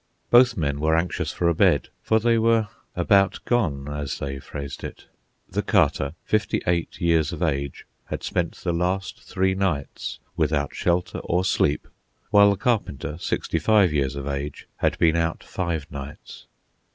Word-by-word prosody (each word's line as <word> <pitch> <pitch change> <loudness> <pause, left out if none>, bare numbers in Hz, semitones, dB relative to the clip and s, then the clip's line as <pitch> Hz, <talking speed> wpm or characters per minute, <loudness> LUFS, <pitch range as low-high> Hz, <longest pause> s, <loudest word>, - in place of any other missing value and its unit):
Both 120 -1 +6
men 70 -4 -1
were 80 +2 +2
anxious 85 +2 -1
for 85 - 0
a 85 - +4
bed, - - +3
for 110 - +2
they 115 +1 +3
were 115 -1 +3 0.3
"about 100 -1 +3
gone," 80 - 0
as 75 -2 -4
they 70 -1 -4
phrased 70 0 -7
it. - - -8 0.4
The - - -1
Carter, 70 +3 +2
fifty 110 -2 +1
eight 85 -1 -1
years 85 -2 +2
of 85 0 -4
age, 70 -4 -2 0.2
had - - -5
spent 85 -2 -1
the 85 - -3
last 90 +3 -1
three 95 0 0
nights 95 -7 -2 0.2
without 75 -2 0
shelter 90 0 0
or 90 +2 0
sleep, 75 -4 +1 0.4
while 100 0 +7
the 100 - +1
Carpenter, 105 - -1
sixty - - -1
five 105 -7 +4
years 70 -2 0
of 70 -1 -5
age, 70 0 -4
had - - +1
been 80 -1 +4
out 85 0 -1
five 85 -5 -3
nights. 70 0 -9
85 Hz, 165 wpm, -24 LUFS, 70-95 Hz, 0.4 s, while